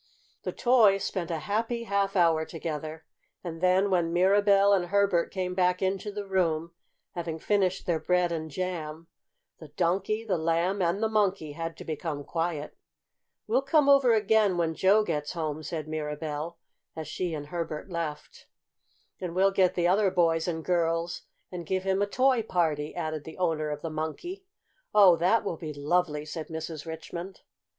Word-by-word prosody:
The - - -3
toys 220 -6 +4
spent 175 -3 -3
a 165 - -1
happy 225 +7 -2
half 200 -2 0
hour 165 -3 +4
together, 160 -1 -6 0.4
and 165 -2 -6
then 185 +2 +3
when 175 -2 +2
Mirabell 200 +2 +4
and 185 -3 +2
Herbert 195 -3 +2
came 185 -1 -2
back 180 0 +2
into 195 +2 -1
the 205 0 -5
room, 170 -4 0 0.4
having 165 -2 -4
finished 190 +1 0
their 170 -2 +1
bread 180 0 +1
and 160 -1 -3
jam, 165 -1 -4 0.5
the 155 - -10
Donkey, 190 +8 -1
the 185 -6 0
Lamb, 170 +4 +1
and 180 +5 +1
the - - +3
Monkey 200 -7 0
had 165 +2 -5
to - - -9
become 155 -2 -4
quiet. 165 -1 -3 0.7
"We'll 240 +5 +2
come 290 +1 +3
over 275 -3 +6
again, 210 -3 +3
when 165 -1 +1
Joe 195 +6 +4
gets 150 -6 -3
home," 155 -2 -3
said 155 0 -5
Mirabell, 155 +1 -4 0.4
as 160 -2 -6
she 170 +2 -3
and 145 -1 -7
Herbert 165 +1 -4
left. 155 -3 -5 0.7
"And 175 -2 -5
we'll 195 +1 +4
get 190 -2 +2
the 175 -1 +2
other 195 +2 +3
boys 165 -2 +2
and 160 -2 -3
girls 170 -1 0 0.3
and 180 -2 -5
give 185 +3 -2
him 190 +1 +1
a 205 - +2
toy 255 +2 +3
party," 160 -8 -1
added 155 -3 -3
the 160 - -10
owner 160 -4 0
of 150 0 -5
the 165 - -3
Monkey. 160 - -5 0.5
"Oh, 195 -4 +8
that 185 +8 +3
will 175 -5 -3
be 155 -2 -6
lovely!" 150 0 0
said 155 +1 -6
Mrs. 160 -1 -6
Richmond. 170 +3 -7
175 Hz, 170 wpm, -28 LUFS, 160-195 Hz, 0.7 s, Oh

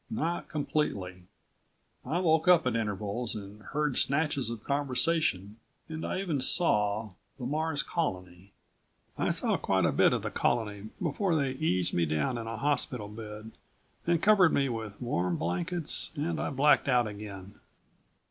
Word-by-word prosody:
Not 175 -6 -2
completely. 100 - -2 0.8
I 165 - -2
woke 160 -3 +2
up 175 -2 +6
at 125 -2 0
intervals 110 +1 -2
and 105 0 -9
heard 150 +3 -1
snatches 140 -4 +1
of 115 -2 -6
conversation 140 - 0 0.3
and 160 -1 -6
I - - -2
even 160 -8 -1
saw 105 - +2 0.3
the 125 - -6
Mars 155 +2 -1
Colony. 90 - -4 0.6
I - - 0
saw - - +1
quite - - +1
a - - +3
bit - - +4
of - - -1
the - - -3
Colony 105 -3 -1
before 175 +2 0
they 140 -3 +1
eased 110 - +1
me 85 -2 +1
down 75 - -1
in 115 - -6
a 115 0 -4
hospital 125 -6 -1
bed, 105 0 -9 0.6
and 170 -1 +2
covered 200 -5 +6
me 140 -1 +2
with 110 -3 -5
warm 90 -8 -1
blankets 165 - +1
and 160 +2 -2
I - - -1
blacked 145 +2 +3
out 125 -2 +3
again. 100 -2 -8
125 Hz, 155 wpm, -29 LUFS, 105-155 Hz, 0.8 s, up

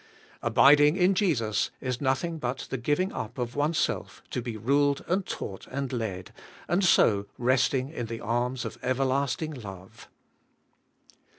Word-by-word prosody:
Abiding 145 +6 +6
in 185 +1 +4
Jesus 125 - +1
is 125 -2 -3
nothing 155 +5 0
but 125 0 -3
the 135 - -1
giving 150 +9 0
up 115 +4 -6
of 120 -1 -3
oneself 150 +3 -1
to 125 - -2
be 115 -2 -5
ruled 140 +5 +1
and 190 +3 +1
taught 95 - -6
and 135 -1 -4
led, 105 -6 -4 0.3
and 175 +3 +1
so 100 - +4
resting 130 +1 +2
in 120 -7 -5
the 115 0 -5
arms 120 +3 -1
of - - -6
Everlasting 135 +4 0
Love. 95 -7 -10
130 Hz, 140 wpm, -27 LUFS, 115-145 Hz, 0.3 s, Abiding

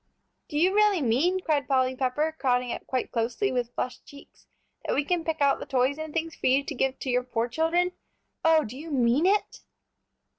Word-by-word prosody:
"Do 295 - -4
you 360 +5 +3
really 415 -6 +3
mean," 315 +11 +2
cried 295 -6 0
Polly 260 -1 +2
Pepper, 285 +5 -1
crowding 250 -2 +1
up - - -6
quite 255 -1 -2
closely, 235 - -1
with 245 -2 -2
flushed 250 0 -4
cheeks, 285 0 -16 0.4
"that - - -1
we 285 - +1
can 350 +1 0
pick 320 -2 -3
out 280 -1 +3
the - - -7
toys 270 +2 +1
and 315 -1 -5
things 330 0 -3
for - - -2
you 265 +2 +3
to 295 - -5
give 270 0 -1
to 260 - -2
your 250 0 +2
poor 240 -2 -2
children? 325 +7 +1 0.5
Oh, 320 -1 +5
do 230 0 -8
you 310 +5 -8
mean 265 +3 +2
it?" 410 +2 0
280 Hz, 210 wpm, -27 LUFS, 255-325 Hz, 0.5 s, Oh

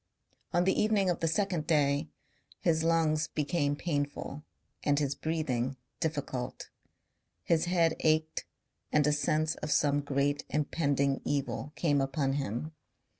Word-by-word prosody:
On 175 - +3
the 190 - +3
evening 210 -3 +3
of 175 - -2
the 165 - +1
second 175 -3 0
day 145 -1 +2 0.5
his 160 -2 +2
lungs 160 -2 +2
became 145 -1 0
painful 145 -2 -3 0.4
and 145 -1 +2
his 140 -2 +1
breathing 135 -5 -1 0.2
difficult. 145 -6 -3 0.7
His 165 - +2
head 170 -2 +2
ached 155 0 +1 0.5
and 150 -1 +4
a 150 - +4
sense 155 +1 +1
of 150 - -5
some 145 0 +3
great 145 0 0
impending 140 -2 +1
evil 140 0 -2
came 145 -2 +2
upon 135 0 0
him. 140 +2 -3
150 Hz, 130 wpm, -31 LUFS, 140-160 Hz, 0.7 s, and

